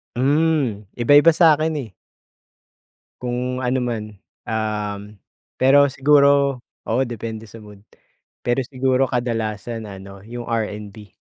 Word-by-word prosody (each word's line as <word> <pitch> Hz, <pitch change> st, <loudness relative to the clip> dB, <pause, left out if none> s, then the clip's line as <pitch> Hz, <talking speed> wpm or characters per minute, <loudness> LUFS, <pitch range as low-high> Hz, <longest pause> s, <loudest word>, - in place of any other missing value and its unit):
Hmm, 140 Hz, -5 st, +1 dB
iba-iba 145 Hz, +7 st, +5 dB
sa'kin, 160 Hz, -1 st, +4 dB
eh 110 Hz, -7 st, -11 dB, 1.3 s
kung 125 Hz, +1 st, -3 dB
ano 130 Hz, +1 st, 0 dB
man, 115 Hz, -3 st, -2 dB, 0.4 s
um, 105 Hz, -2 st, -3 dB, 0.4 s
pero 140 Hz, +2 st, +6 dB
siguro 140 Hz, -1 st, +3 dB, 0.3 s
oo 115 Hz, +4 st, +1 dB
depende 115 Hz, -1 st, -6 dB
sa 115 Hz, -, -12 dB
mood. 105 Hz, -1 st, -14 dB, 0.6 s
Pero 120 Hz, +2 st, +1 dB
siguro 130 Hz, 0 st, +1 dB
kadalasan 115 Hz, -2 st, -3 dB
ano, 95 Hz, 0 st, -11 dB
yung 120 Hz, +1 st, -7 dB
R&B. 105 Hz, -3 st, -4 dB
120 Hz, 105 wpm, -21 LUFS, 110-135 Hz, 1.3 s, pero